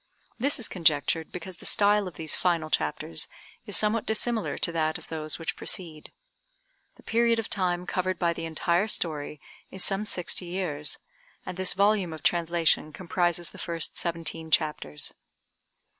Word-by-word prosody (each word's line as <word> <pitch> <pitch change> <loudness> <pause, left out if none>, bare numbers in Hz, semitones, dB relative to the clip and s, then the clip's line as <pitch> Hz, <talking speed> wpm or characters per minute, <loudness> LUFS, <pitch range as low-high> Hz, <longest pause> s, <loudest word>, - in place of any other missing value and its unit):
This 280 +5 +2
is 240 - 0
conjectured 160 -1 +2
because 180 0 -7
the - - -12
style 205 -1 +4
of 180 - -8
these 160 -2 -1
final 165 -3 +1
chapters 80 +1 0 0.4
is - - +3
somewhat 215 +1 +2
dissimilar 220 0 +1
to 170 - +1
that 160 -1 0
of - - -15
those 155 -1 -2
which 165 - -3
precede. 160 -5 -5 0.8
The - - -19
period 230 0 +3
of 225 - -3
time 180 -2 +1
covered 185 0 -1
by 170 -1 +2
the 165 - -5
entire 170 +4 +1
story 150 -7 -1 0.3
is 190 - 0
some 200 +2 0
sixty 180 -1 -1
years, 165 -5 -2 0.5
and - - -5
this 185 0 +1
volume 200 -3 +3
of 155 -2 -9
translation 170 -3 +2
comprises 175 0 0
the - - -12
first 165 -2 -2
seventeen 165 -1 -2
chapters. 150 - 0
175 Hz, 160 wpm, -28 LUFS, 160-195 Hz, 0.8 s, style